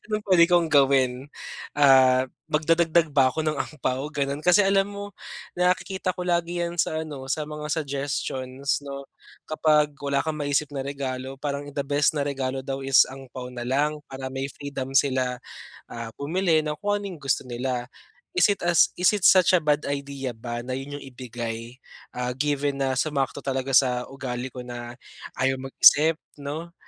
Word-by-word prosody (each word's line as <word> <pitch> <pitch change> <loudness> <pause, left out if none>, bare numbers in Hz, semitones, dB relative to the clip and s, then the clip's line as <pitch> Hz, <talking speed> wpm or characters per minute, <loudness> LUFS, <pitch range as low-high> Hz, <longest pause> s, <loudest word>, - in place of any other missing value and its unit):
Anong 215 0 -1
puwede 175 -3 +5
kong 175 -2 +4
gawin? 135 -2 +2 0.5
Ah, 130 -2 +6 0.2
magdadagdag 165 0 +2
ba 135 -3 +5
ako 155 +4 -3
ng 155 - +1
ampao, 140 -1 -3
gano'n? 140 0 -2
Kasi, 180 +4 +5
alam 195 0 +2
mo, 205 0 -8 0.4
nakikita 185 +1 0
ko 180 - -3
lagi 175 0 0
'yan 170 0 -2
sa 155 - -3
ano, 135 -3 -8
sa 150 0 -1
mga 150 0 -6
suggestions 140 -2 -2
'no, 140 -1 -7 0.4
kapag 150 -1 +2
wala 140 -1 0
kang 160 +2 -1
maisip 145 0 0
na 135 - -2
regalo, 135 -1 -5
parang 145 0 -4
the 140 -1 -4
best 145 +1 +3
na 140 - 0
regalo 135 -2 -2
daw 135 +1 -4
is 135 0 +5
ampao 130 -1 -9
na 120 - -5
lang 145 +4 0
para 135 0 -6
may 135 +1 -3
freedom 135 -2 -1
sila, 130 -2 0 0.5
ah, 115 -1 -7
bumili 160 +2 +1
ng 150 -1 -4
kung 205 +2 -1
ano'ng 195 -4 -6
gusto 135 -2 0
nila. 125 0 -3 0.4
Is 180 - +4
it 200 -3 -1 0.3
is 180 +4 +4
it 205 - -1
such 185 -1 +5
a 180 - +5
bad 150 -1 +1
idea 140 -2 -4
ba 120 +1 -6
na 130 - -3
'yon 140 +2 -5
'yung 140 - -10
ibigay, 120 -2 -6 0.4
ah, 125 0 -2
given 140 0 -1
na 130 -1 0
sumakto 140 -2 -1
talaga 135 0 -2
sa 125 -2 +1
ugali 130 -2 -5
ko 125 0 -9
na 120 0 -8 0.4
ayaw 130 0 0
mag-isip, 150 +4 +5 0.2
'no? 155 +4 -6
140 Hz, 170 wpm, -25 LUFS, 130-155 Hz, 0.5 s, Ah